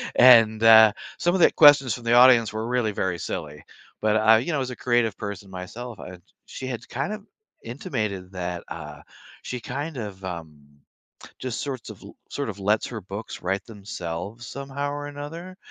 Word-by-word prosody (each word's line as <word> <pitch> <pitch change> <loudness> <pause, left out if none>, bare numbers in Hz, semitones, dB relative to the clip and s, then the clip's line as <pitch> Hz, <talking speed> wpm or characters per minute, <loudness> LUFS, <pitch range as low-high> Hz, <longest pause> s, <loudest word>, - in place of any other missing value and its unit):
And, 115 -3 +7
uh, 110 -1 +8 0.3
some 175 +1 +1
of 185 - +1
the - - +6
questions 145 -6 +6
from 120 -2 -8
the 115 - +2
audience 120 -3 +6
were 110 +1 -4
really 120 -3 0
very 95 -3 -2
silly, 75 -1 -6 0.4
but, 110 0 +2
uh, 110 +1 +6
you 130 +9 -2
know, 140 -4 0
as 130 - -3
a - - -6
creative 120 -4 +1
person 100 -2 -7
myself, 105 +5 -8
I 90 0 -9 0.3
she 130 - -8
had 120 -2 -6
kind 140 +11 -3
of 210 -1 -8 0.4
intimated 105 -6 -4
that, 90 -2 -5
uh, 75 -3 -8 0.4
she 125 - -5
kind 140 +5 -5
of, 100 -4 -7
um, 80 -4 -7 0.8
just 130 -3 -4
sorts 135 -4 -5
of - - -11
l - - -13
sort 140 - -4
of 100 - -7
lets 105 +2 +1
her 115 -3 -7
books 100 +4 -8
write 95 +2 -2
themselves, 100 0 -7
somehow 140 +1 -5
or 145 0 -5
another? 165 +6 -8
115 Hz, 185 wpm, -24 LUFS, 100-130 Hz, 0.8 s, uh